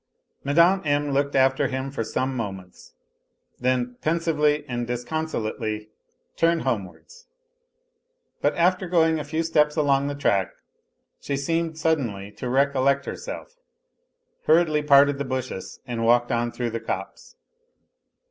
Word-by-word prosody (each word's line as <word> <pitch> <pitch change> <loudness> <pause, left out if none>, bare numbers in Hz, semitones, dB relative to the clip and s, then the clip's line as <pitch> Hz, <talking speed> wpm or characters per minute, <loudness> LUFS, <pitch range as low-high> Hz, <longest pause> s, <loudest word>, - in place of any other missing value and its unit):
Mme. 170 +7 +4
M. 145 -1 0
looked 140 +1 0
after 135 +1 +3
him 130 0 -4
for 135 -5 -3
some 130 +4 -2
moments, 95 -6 -7 0.6
then 125 -1 0
pensively 150 -2 +1
and 120 -1 -3
disconsolately 115 -5 -3 0.5
turned 165 0 +2
homewards. 130 - -5 1.1
But - - +1
after 180 +1 +2
going 160 -2 +3
a - - -3
few 155 +3 -2
steps 150 -2 +2
along 140 -3 +2
the 145 - -3
track 100 -9 +1 0.7
she 140 - -3
seemed 165 +3 -1
suddenly 125 -12 -1
to 125 +4 -6
recollect 140 +1 +2
herself, - - -7 0.9
hurriedly 155 -1 +4
parted 145 -1 +5
the - - 0
bushes 130 -7 -5
and 115 -2 -3
walked 120 +1 +3
on 120 0 0
through 120 -1 -3
the 115 - -3
copse. - - -6
140 Hz, 130 wpm, -24 LUFS, 120-155 Hz, 1.1 s, parted